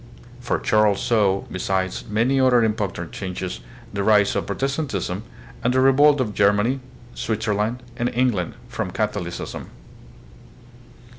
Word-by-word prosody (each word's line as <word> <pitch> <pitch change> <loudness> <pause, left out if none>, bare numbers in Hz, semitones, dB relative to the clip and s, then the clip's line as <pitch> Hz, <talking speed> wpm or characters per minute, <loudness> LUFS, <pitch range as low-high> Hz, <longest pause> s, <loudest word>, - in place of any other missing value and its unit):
For 125 - -1
Charles 105 -2 +2
saw, 105 -6 +2
besides 95 0 -2
many 120 +6 +2
other 125 -3 +5
important 105 -6 -2
changes, 95 -1 -5 0.3
the 100 - -1
rise 105 -1 +4
of - - -1
Protestantism, 135 - -2 0.4
and 125 +2 +1
the - - +4
revolt 140 +2 +5
of 110 -5 -1
Germany, 105 +7 +2 0.3
Switzerland, 110 +2 -1
and 120 0 0
England 120 -8 0
from - - -3
Catholicism. - - -4
110 Hz, 120 wpm, -23 LUFS, 100-125 Hz, 0.4 s, other